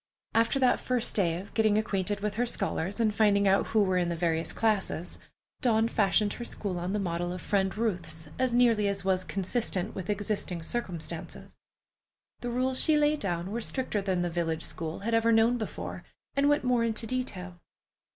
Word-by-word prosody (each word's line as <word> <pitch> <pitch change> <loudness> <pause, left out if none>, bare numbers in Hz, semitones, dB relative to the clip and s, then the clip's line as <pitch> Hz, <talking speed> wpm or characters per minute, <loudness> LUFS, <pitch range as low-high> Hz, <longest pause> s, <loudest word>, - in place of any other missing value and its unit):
After 230 +4 +3
that 255 -2 +3
first 250 -2 +1
day 175 -4 +2
of 200 +2 -11
getting 215 -2 +3
acquainted 205 -1 -1
with 210 0 -1
her 245 - +2
scholars, 195 -2 -1
and 220 -2 +2
finding 205 -2 +3
out 195 +1 +3
who 220 -2 +3
were 185 -2 +2
in 175 -1 0
the 170 - -1
various 165 -1 0
classes, 200 -6 -1 0.4
Dawn 225 -4 +3
fashioned 205 -1 +2
her 240 - -6
school 195 -6 -4
on 180 +3 -3
the 210 - 0
model 175 -2 -2
of 180 - -5
Friend 195 +2 0
Ruth's 170 -8 -2
as 260 -1 +2
nearly 235 -4 +4
as 200 -1 -2
was 185 -1 +2
consistent 195 0 -2
with 185 -1 -6
existing 205 -4 -2
circumstances. 170 -6 -5 0.8
The 245 - -4
rules 255 +2 0
she 310 -2 +4
laid 300 0 +3
down 175 -1 -2
were 235 +2 -2
stricter 240 -3 -1
than 185 -2 0
the 175 - -2
village 165 -1 -1
school 160 +1 -5
had 230 +3 -2
ever 225 0 +4
known 230 +2 +4
before, 220 - -5 0.3
and 280 +1 +3
went 290 -1 +2
more 250 -2 +2
into 225 0 0
detail. 185 -8 -4
205 Hz, 190 wpm, -29 LUFS, 180-230 Hz, 0.8 s, nearly